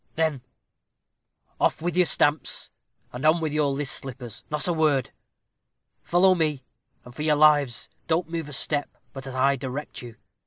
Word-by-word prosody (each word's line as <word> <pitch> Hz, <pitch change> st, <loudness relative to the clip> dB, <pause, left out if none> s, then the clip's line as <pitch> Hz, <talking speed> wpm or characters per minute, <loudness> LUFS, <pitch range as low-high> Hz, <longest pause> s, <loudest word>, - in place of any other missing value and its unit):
"Then 155 Hz, -5 st, 0 dB, 1.2 s
off -, -, +2 dB
with 175 Hz, +2 st, -2 dB
your 180 Hz, -1 st, +4 dB
stamps, 145 Hz, 0 st, 0 dB, 0.4 s
and 125 Hz, +3 st, -6 dB
on 155 Hz, +2 st, +4 dB
with 155 Hz, -2 st, -2 dB
your 150 Hz, -1 st, +2 dB
list 140 Hz, 0 st, -2 dB
slippers; 125 Hz, -4 st, -7 dB
not 150 Hz, +2 st, -2 dB
a 175 Hz, -, +1 dB
word. 150 Hz, -5 st, +1 dB, 0.9 s
Follow 185 Hz, +2 st, +4 dB
me, 155 Hz, -6 st, -1 dB, 0.4 s
and, 125 Hz, -, -12 dB
for 150 Hz, -, -7 dB
your 155 Hz, 0 st, +3 dB
lives, 145 Hz, -5 st, +3 dB, 0.2 s
don't 165 Hz, +1 st, +1 dB
move 165 Hz, -2 st, -4 dB
a -, -, -8 dB
step 145 Hz, +2 st, +1 dB, 0.2 s
but 135 Hz, 0 st, -8 dB
as 130 Hz, -, -7 dB
I 135 Hz, +1 st, +2 dB
direct 135 Hz, +3 st, -6 dB
you. 120 Hz, -2 st, -10 dB
150 Hz, 165 wpm, -25 LUFS, 135-160 Hz, 1.2 s, your